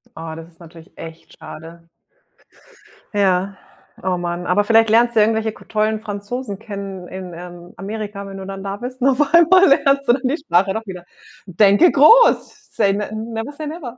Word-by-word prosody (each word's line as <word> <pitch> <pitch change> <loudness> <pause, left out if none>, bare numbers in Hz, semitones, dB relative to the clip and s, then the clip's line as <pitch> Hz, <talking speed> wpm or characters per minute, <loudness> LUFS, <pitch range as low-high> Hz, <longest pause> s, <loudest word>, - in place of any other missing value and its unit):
Oh, 160 0 -7
das 165 0 -10
ist 165 - -27
natürlich 170 +1 -15
echt 165 0 -12
schade. 165 +1 -12 1.3
Ja. 195 -1 0 0.4
Oh 185 -1 -1
Mann, 175 0 -4
aber 195 +3 +2
vielleicht 225 +1 +3
lernst 235 +2 +3
du - - +6
irgendwelche 220 +1 +1
k - - -17
tollen 215 0 -1
Franzosen 205 +1 -6
kennen 195 -4 -8
in, 185 -2 -8
ähm, 175 0 -11
Amerika, 205 +1 -6
wenn 195 0 -9
du 190 - -8
dann 195 0 -8
da 200 0 -5
bist 250 +3 -8
und 270 - +4
auf 280 +3 +1
einmal 365 +3 +6
lernst 275 -1 +2
du 240 - +5
dann 260 - -2
die 270 +5 0
Sprache 195 - +1
doch 220 +2 -5
wieder. 180 -3 -9 0.4
Denke 200 - +4
groß. 380 - +4
Say 195 - +2
ne 205 +1 -3
never 225 +4 -5
say 300 +1 -8
never. 290 -6 -8
205 Hz, 185 wpm, -19 LUFS, 185-240 Hz, 1.3 s, du